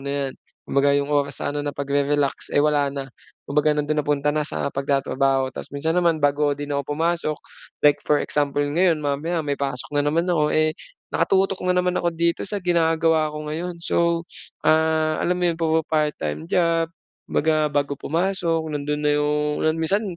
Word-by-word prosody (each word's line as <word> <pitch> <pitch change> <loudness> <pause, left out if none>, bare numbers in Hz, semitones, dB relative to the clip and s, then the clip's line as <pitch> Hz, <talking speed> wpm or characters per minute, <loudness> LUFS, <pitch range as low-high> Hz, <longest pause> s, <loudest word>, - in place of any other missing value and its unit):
na 140 - -2 0.2
'yan. - - -10 0.3
Kumbaga 140 +1 +3
'yong 140 0 0
oras 145 -1 0
sana 145 +1 -2
na 145 - -2
pagre-relax 140 0 0
eh, 145 - +5
wala 145 -2 +2
na. 140 -1 -4 0.4
Kumbaga 150 +1 +2
nandun 150 +1 0
napunta 145 0 0
na 150 0 0
sa - - -2
pagtatrabaho. 135 -1 +1
Tas - - -8
minsan 160 +4 -1
naman 170 -3 +2
bago 145 0 +2
o - - -2
din 145 0 -6
ako 140 +1 -2
pumasok, 165 -2 0 0.5
like 145 -1 +6
for 150 -1 +3
example 145 -1 0
ngayon 160 +3 +2
mamaya 150 +4 -1
may 145 -1 -1
pasok 135 -3 -3
na 145 - +3
naman 165 +4 +1
ako 150 -4 +2
eh, 155 0 +2 0.4
nakatutok 195 0 +1
na - - +4
naman 180 0 +1
ako 170 -1 0
dito 170 +1 0
sa 200 0 -4
ginagawa 165 -2 +2
ko 150 0 -6
ngayon. 170 +3 -4
So, 170 0 +1 0.4
ah, 160 0 +3
alam 180 +1 +1
mo - - +1
'yon, 165 - -4
puma-part-time 155 - 0
job 165 -1 +2 0.4
baga, 155 0 +2
bago 140 0 0
pumasok 165 -1 -1
nandun 150 0 -2
na 150 - +3
'yong 150 0 0
minsan 195 +7 +1
150 Hz, 175 wpm, -23 LUFS, 145-165 Hz, 0.5 s, like